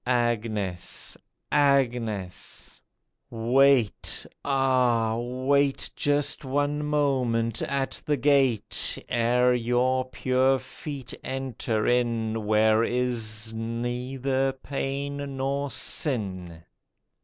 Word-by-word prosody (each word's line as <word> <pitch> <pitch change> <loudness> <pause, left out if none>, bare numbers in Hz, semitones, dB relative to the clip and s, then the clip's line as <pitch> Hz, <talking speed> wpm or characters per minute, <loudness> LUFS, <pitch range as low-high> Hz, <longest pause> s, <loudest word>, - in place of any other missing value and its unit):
Agnes! 110 -7 -1 0.4
Agnes! 120 -9 0 0.5
wait, 120 0 +2 0.2
ah! 125 -5 +2
wait 130 +4 0
Just 145 0 0
one 145 +2 0
moment 130 -6 0
at 135 -1 -2
the 150 -1 +2
gate, 135 -5 +2
Ere 125 +1 +3
your 125 +2 +1
pure 130 +1 +2
feet 135 -2 -8
enter 130 -4 -2
in 115 -3 0
Where 110 +1 +4
is 115 -3 -1
neither 125 +4 -2
pain 140 +1 -4 0.2
nor 140 +1 -1
sin. 95 - -2
125 Hz, 80 wpm, -26 LUFS, 115-135 Hz, 0.5 s, Where